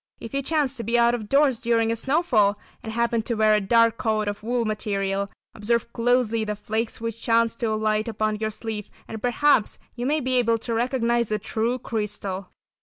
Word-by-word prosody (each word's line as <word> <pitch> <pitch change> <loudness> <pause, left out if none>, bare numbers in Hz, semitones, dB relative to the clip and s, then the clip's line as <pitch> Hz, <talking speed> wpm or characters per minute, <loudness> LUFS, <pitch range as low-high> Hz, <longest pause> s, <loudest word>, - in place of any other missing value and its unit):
If 230 - -9
you 275 - 0
chance 280 -2 0
to 230 - -4
be 235 +3 +1
out 235 0 +4
of 220 -4 -4
doors 275 -4 +3
during 230 -1 +1
a - - 0
snowfall, 230 - +2 0.2
and 220 - -6
happen 235 0 +1
to 235 +2 -3
wear 215 0 +4
a 210 - +3
dark 230 +3 +3
coat 215 -2 0
of 205 0 -3
wool 235 +1 -1
material, 200 -2 -1 0.2
observe 235 +2 -1
closely 230 -2 +1
the 210 -1 -3
flakes 220 +2 -3
which 230 0 -5
chance 230 0 +2
to 230 - -1
alight 215 0 0
upon 215 -1 -1
your 220 0 -1
sleeve 220 -1 -6 0.2
and 220 -1 -7
perhaps 245 -2 +2 0.2
you 245 0 -3
may 305 +2 +2
be 255 -2 0
able 230 -1 +2
to 230 +1 -4
recognise 235 -1 0
a 215 - +2
true 225 +4 -1
crystal. 205 -5 -4
230 Hz, 200 wpm, -24 LUFS, 215-240 Hz, 0.2 s, out